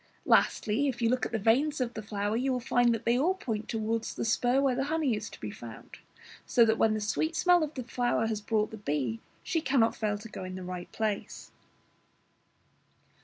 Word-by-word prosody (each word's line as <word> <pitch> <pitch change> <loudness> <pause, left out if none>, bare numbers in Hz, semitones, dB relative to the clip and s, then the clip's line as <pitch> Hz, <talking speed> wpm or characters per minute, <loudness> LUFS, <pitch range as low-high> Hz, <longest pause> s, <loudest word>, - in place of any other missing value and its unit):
Lastly, 225 +7 +3
if 255 -3 -2
you 230 -2 +2
look 255 - +1
at - - -16
the 225 - 0
veins 265 +8 +2
of 245 -2 -1
the 220 - -5
flower, 205 0 -2
you 260 +3 0
will 250 - 0
find 245 0 +2
that 230 -1 -2
they 235 +2 +3
all 355 +7 +2
point 225 - -4
towards 225 0 -2
the - - -2
spur 245 +3 +2
where 275 -2 +2
the 265 +2 -1
honey 300 -5 +1
is 210 +1 -5
to - - -13
be 105 - -5
found, 110 +1 -11 0.4
so 235 - +4
that 220 0 +1
when 220 -1 +3
the - - -1
sweet 315 +10 -1
smell 355 0 +4
of 310 0 -3
the 255 - -4
flower 240 -1 0
has 220 -2 -2
brought 210 0 0
the 220 - -7
bee, 145 - -2 0.2
she 325 - -1
cannot 260 -6 +2
fail 210 -1 -1
to 215 +2 -10
go 195 -3 -8
in 185 0 -6
at - - -6
the 185 - -6
right 180 -1 -6
place. 215 -2 -3
225 Hz, 225 wpm, -29 LUFS, 210-255 Hz, 0.4 s, so